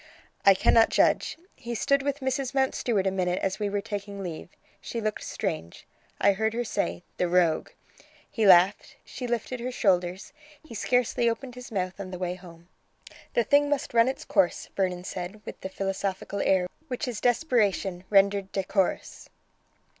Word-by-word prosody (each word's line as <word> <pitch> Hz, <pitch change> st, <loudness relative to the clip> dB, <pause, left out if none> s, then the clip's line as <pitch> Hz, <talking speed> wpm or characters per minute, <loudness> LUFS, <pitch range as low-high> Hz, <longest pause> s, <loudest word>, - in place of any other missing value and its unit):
"I 195 Hz, -, +9 dB
cannot 225 Hz, +4 st, +5 dB
judge. -, -, +2 dB, 0.2 s
He 235 Hz, 0 st, -6 dB
stood 280 Hz, +5 st, +2 dB
with 285 Hz, +1 st, -2 dB
Mrs. 265 Hz, 0 st, -2 dB
Mountstuart 245 Hz, -6 st, +1 dB
a 190 Hz, -, +2 dB
minute 180 Hz, -1 st, 0 dB
as 190 Hz, +2 st, -1 dB
we 205 Hz, -1 st, -1 dB
were 200 Hz, 0 st, -1 dB
taking 200 Hz, -2 st, -6 dB
leave. 170 Hz, -2 st, -6 dB, 0.3 s
She 235 Hz, -, -5 dB
looked 215 Hz, -1 st, -2 dB
strange. 80 Hz, +2 st, -4 dB, 0.3 s
I 200 Hz, -, +4 dB
heard 220 Hz, +3 st, -1 dB
her 240 Hz, -, 0 dB
say: 200 Hz, -5 st, -2 dB
'The 180 Hz, -, +1 dB
rogue!' 170 Hz, -3 st, +2 dB, 0.6 s
He 220 Hz, -3 st, 0 dB
laughed. 185 Hz, +2 st, +5 dB
She 250 Hz, -, -6 dB
lifted 240 Hz, +1 st, -2 dB
her 250 Hz, +2 st, -3 dB
shoulders. 185 Hz, -3 st, 0 dB, 0.3 s
He 315 Hz, -, -12 dB
scarcely 245 Hz, +1 st, +1 dB
opened 245 Hz, +2 st, -4 dB
his 250 Hz, 0 st, -10 dB
mouth 185 Hz, -2 st, -3 dB
on 195 Hz, -2 st, -6 dB
the 185 Hz, -, -6 dB
way 180 Hz, 0 st, -2 dB
home." 175 Hz, -2 st, -14 dB, 0.7 s
"The 235 Hz, -, +4 dB
thing 285 Hz, +5 st, +3 dB
must 290 Hz, -3 st, -1 dB
run 230 Hz, 0 st, +5 dB
its 265 Hz, -, -3 dB
course," 190 Hz, -5 st, +1 dB
Vernon 180 Hz, -2 st, -1 dB
said, 185 Hz, +2 st, -6 dB
with -, -, -8 dB
the 190 Hz, -, -5 dB
philosophical 195 Hz, +1 st, -3 dB
air 185 Hz, -2 st, +2 dB, 0.2 s
which 255 Hz, +1 st, -3 dB
is 235 Hz, -4 st, -4 dB
desperation 215 Hz, -, +1 dB
rendered 200 Hz, -1 st, +3 dB
decorous. 195 Hz, 0 st, -1 dB
200 Hz, 170 wpm, -27 LUFS, 185-240 Hz, 0.7 s, I